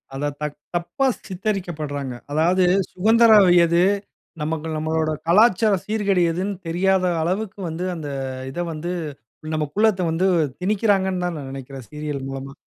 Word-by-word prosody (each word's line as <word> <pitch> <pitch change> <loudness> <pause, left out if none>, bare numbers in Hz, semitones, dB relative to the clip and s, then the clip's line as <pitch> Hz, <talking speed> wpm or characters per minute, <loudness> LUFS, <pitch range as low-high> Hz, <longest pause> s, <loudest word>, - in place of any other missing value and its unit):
அத 145 +2 -1
தக் 150 -1 -4 0.2
தப்பா 175 +11 -1 0.2
சித்தரிக்கப்பட்றாங்க. 175 - -3 0.2
அதாவது 170 +5 +3 0.3
சுதந்திரம் 220 -1 +5 0.2
எது? 170 +1 +3 0.6
நமக்கு 155 +1 -2
நம்மளோட 155 0 0 0.2
கலாச்சாரம் 200 +1 +4
சீர்கேடு 205 -4 +1
எதுன்னு 190 +4 -2
தெரியாத 185 +3 +2 0.2
அளவுக்கு 190 +4 -2
வந்து 170 +3 -4
அந்த 155 -3 -6 0.4
இத 175 - -6
வந்து 165 +3 -4 0.6
நமக்குள்ள 155 +9 +1 0.2
வந்து 180 +4 +1 0.3
திணிக்கிறாங்கன்னு 190 -2 +1
தான் 175 -2 -2
நான் 135 -2 -7
நினைக்கிறேன் 135 -2 -9
சீரியல் 150 -2 -4
மூலமா. 135 0 -6
175 Hz, 125 wpm, -22 LUFS, 150-195 Hz, 0.6 s, சுதந்திரம்